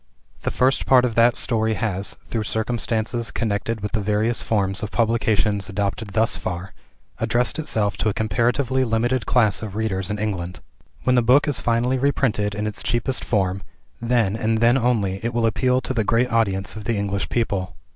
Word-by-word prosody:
The - - -1
first 130 +1 +1
part 125 -1 +6
of 120 - -1
that 115 +1 +4
story 110 -2 +1
has, 100 -1 -3
through 110 -2 -3
circumstances 115 +1 -1
connected 110 0 -2
with 105 0 -3
the 105 - 0
various 105 +3 0
forms 100 -1 0
of 110 - -3
publications 110 -3 +1
adopted 100 +1 -3
thus 110 0 +2
far, 90 +2 -5 0.5
addressed 120 +5 0
itself 105 -9 -1
to 110 - +1
a - - -1
comparatively 120 +5 +1
limited 120 +1 0
class 110 -5 +2
of 105 -3 -6
readers 100 -3 -2
in 105 - -2
England. 90 -4 -3 0.4
When 125 - +2
the 125 - +4
book 130 +6 +4
is 145 -4 +1
finally 120 +2 +1
reprinted 115 -7 0
in 105 0 -2
its 105 -1 -4
cheapest 120 +3 -1
form 95 -3 0 0.4
then, 115 -4 +1
and 110 0 0
then 120 +2 +4
only, 110 -7 0
it 120 0 -2
will 115 -1 +2
appeal 125 +4 +2
to 130 - -3
the 115 -3 +1
great 115 +4 +1
audience 100 -4 0
of 110 -2 -8
the 115 - 0
English 100 -1 -2
people. 95 -6 -1
110 Hz, 185 wpm, -22 LUFS, 105-120 Hz, 0.5 s, part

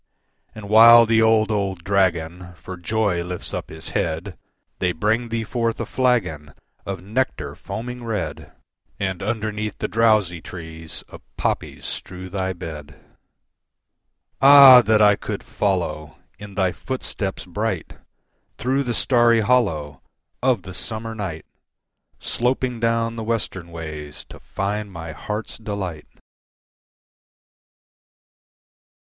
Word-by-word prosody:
And 110 -2 -8
while 115 +2 +9
the 110 0 +3
old, 110 -1 +4
old 95 -4 -2
dragon 90 -2 0
For 95 +2 -8
joy 90 -1 0
lifts 90 0 -5
up - - -4
his 80 +1 -9
head, 85 +3 -2 0.4
They 90 -1 +1
bring 110 +7 0
thee 115 0 -2
forth 115 +1 -2
a - - -2
flagon 105 - 0 0.3
Of 95 -2 -4
nectar 120 +7 -2
foaming 125 +2 -6
red, 80 -10 -4 0.5
And 95 -3 -2
underneath 110 -1 -3
the - - -2
drowsy 105 -7 +2
trees 80 -2 -8
Of - - -12 0.2
poppies - - -2
strew 90 0 -6
thy 95 -1 -1
bed. 75 -5 -8 1.4
Ah! 135 -2 +10
that 110 -1 +3
I 105 0 +6
could - - -5
follow 75 -6 -2 0.2
In 105 -1 -10
thy 95 -2 +2
footsteps 105 -4 -4
bright, 95 -1 -3 0.6
Through 130 +3 0
the 120 -4 -2
starry 120 -3 +4
hollow 80 - +1 0.4
Of 125 -1 +2
the 95 - -9
summer 115 +4 -5
night, 95 -8 -5 0.7
Sloping 125 0 -1
down 115 0 0
the 115 - -4
western 110 -6 -3
ways 75 -3 -8
To - - -12
find 100 +1 -3
my 85 -2 -7
heart's 105 +10 -5
delight! 100 -8 -5
100 Hz, 120 wpm, -22 LUFS, 85-115 Hz, 1.4 s, Ah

